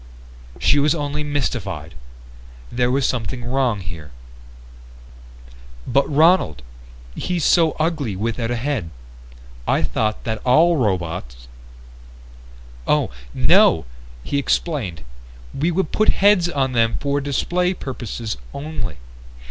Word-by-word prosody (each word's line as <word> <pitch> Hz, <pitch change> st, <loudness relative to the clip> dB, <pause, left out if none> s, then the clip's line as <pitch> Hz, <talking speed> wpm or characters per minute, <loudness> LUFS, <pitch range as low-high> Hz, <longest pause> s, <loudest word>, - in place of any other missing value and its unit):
She 145 Hz, -, +4 dB
was 150 Hz, +3 st, +3 dB
only 150 Hz, -1 st, -2 dB
mystified. 100 Hz, -, -3 dB, 0.8 s
There 125 Hz, 0 st, +1 dB
was 135 Hz, +1 st, +1 dB
something 120 Hz, 0 st, -3 dB
wrong 125 Hz, -4 st, 0 dB
here. 85 Hz, -4 st, -8 dB, 1.8 s
"But 135 Hz, +3 st, +2 dB
Ronald, 150 Hz, -, +3 dB, 0.5 s
he's 180 Hz, -, -2 dB
so 165 Hz, -3 st, +4 dB
ugly 155 Hz, -, -1 dB
without 115 Hz, +3 st, -2 dB
a 120 Hz, -, 0 dB
head. 120 Hz, -, -2 dB, 0.8 s
I -, -, +2 dB
thought 110 Hz, -1 st, -1 dB
that 110 Hz, -2 st, -3 dB
all 160 Hz, +7 st, +5 dB
robots 85 Hz, -, -2 dB, 0.7 s
" -, -, -19 dB
"Oh, -, -, +2 dB, 0.2 s
no," 80 Hz, -, +5 dB, 0.4 s
he 140 Hz, -, -1 dB
explained, 125 Hz, -, -1 dB, 0.5 s
"we 155 Hz, +5 st, 0 dB
would 175 Hz, -1 st, -1 dB
put 215 Hz, -, +3 dB
heads 195 Hz, -3 st, +4 dB
on 135 Hz, -5 st, 0 dB
them 115 Hz, -2 st, +2 dB
for 140 Hz, 0 st, 0 dB
display 180 Hz, +6 st, 0 dB
purposes 120 Hz, -, -5 dB, 0.2 s
only. 140 Hz, -, -5 dB
125 Hz, 115 wpm, -21 LUFS, 95-150 Hz, 1.8 s, all